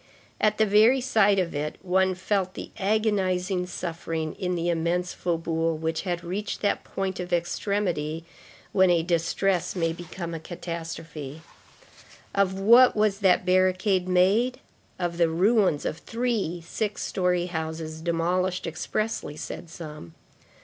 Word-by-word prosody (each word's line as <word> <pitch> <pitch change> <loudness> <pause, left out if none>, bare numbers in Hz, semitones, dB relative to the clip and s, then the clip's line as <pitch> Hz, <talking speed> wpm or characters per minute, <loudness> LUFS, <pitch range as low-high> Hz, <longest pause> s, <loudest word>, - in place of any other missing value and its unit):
At 215 0 +2
the 220 - +4
very 215 +6 +5
sight 220 -6 +3
of 180 -3 0
it, 150 +1 -3
one 190 0 +2
felt 185 0 -1
the - - -7
agonizing 190 -3 +1
suffering 165 -3 -4
in 180 -1 -1
the 170 0 -1
immense 175 +2 0
faubourg, 165 -2 -1
which 160 0 -1
had 175 -3 -3
reached 200 +4 -4
that 205 - 0
point 190 -1 -3
of 180 0 -5
extremity 170 -3 -1 0.5
when 190 -1 +4
a 170 -2 +3
distress 175 +2 0
may 165 -2 0
become 170 0 -7
a 165 - -4
catastrophe. 165 -3 -7 0.9
Of 195 -1 +1
what 235 +6 +7
was 210 -2 +2
that 190 -2 +3
barricade 185 +1 +2
made? 205 +8 +3 0.4
Of 175 -1 -3
the 170 -1 +4
ruins 190 -1 +2
of 160 - -2
three 225 -8 -2
six 210 +3 -3
story 180 -2 0
houses 160 -2 -4
demolished 175 +2 0
expressly, 165 0 -3
said 170 - -7
some. 150 - -9
180 Hz, 135 wpm, -26 LUFS, 165-195 Hz, 0.9 s, what